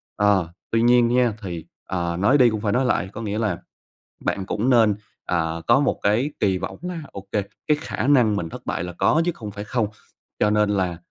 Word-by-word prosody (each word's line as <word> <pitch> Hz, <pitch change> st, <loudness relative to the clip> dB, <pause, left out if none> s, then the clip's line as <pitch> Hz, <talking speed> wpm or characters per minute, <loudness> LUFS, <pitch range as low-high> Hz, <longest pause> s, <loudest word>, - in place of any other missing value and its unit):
ờ, 100 Hz, -4 st, +3 dB, 0.2 s
tuy 115 Hz, 0 st, +2 dB
nhiên 120 Hz, 0 st, +5 dB
nha, 120 Hz, -1 st, +2 dB
thì, 85 Hz, -4 st, -5 dB, 0.2 s
ờ, 85 Hz, -2 st, -2 dB
nói 125 Hz, +9 st, +4 dB
đi 125 Hz, -3 st, +6 dB
cũng 110 Hz, -1 st, -3 dB
phải 105 Hz, -2 st, 0 dB
nói 130 Hz, +4 st, +2 dB
lại, 95 Hz, -6 st, 0 dB
có 110 Hz, -, -6 dB
nghĩa 105 Hz, -1 st, -3 dB
là 105 Hz, -6 st, 0 dB, 0.6 s
bạn 95 Hz, -, -2 dB
cũng 110 Hz, +5 st, -1 dB
nên, 115 Hz, -5 st, +5 dB, 0.3 s
à, 80 Hz, -1 st, -1 dB
có -, -, +6 dB
một 145 Hz, -, +1 dB
cái 120 Hz, +9 st, +2 dB
kỳ 95 Hz, -2 st, +2 dB
vọng -, -, -5 dB
là, 180 Hz, -2 st, -4 dB
OK, 100 Hz, +1 st, -3 dB, 0.2 s
cái 150 Hz, -, +3 dB
khả -, -, -3 dB
năng 125 Hz, -7 st, +4 dB
mình 85 Hz, -5 st, -3 dB
thất -, -, -10 dB
bại -, -, -2 dB
là 90 Hz, 0 st, -6 dB
có 155 Hz, -, +3 dB
chứ 175 Hz, -, +2 dB
không 105 Hz, -3 st, -7 dB
phải 100 Hz, 0 st, -6 dB
không. 110 Hz, 0 st, -1 dB, 0.5 s
Cho 105 Hz, -, +3 dB
nên 105 Hz, 0 st, +2 dB
là, 95 Hz, -4 st, 0 dB
105 Hz, 220 wpm, -23 LUFS, 95-120 Hz, 0.6 s, đi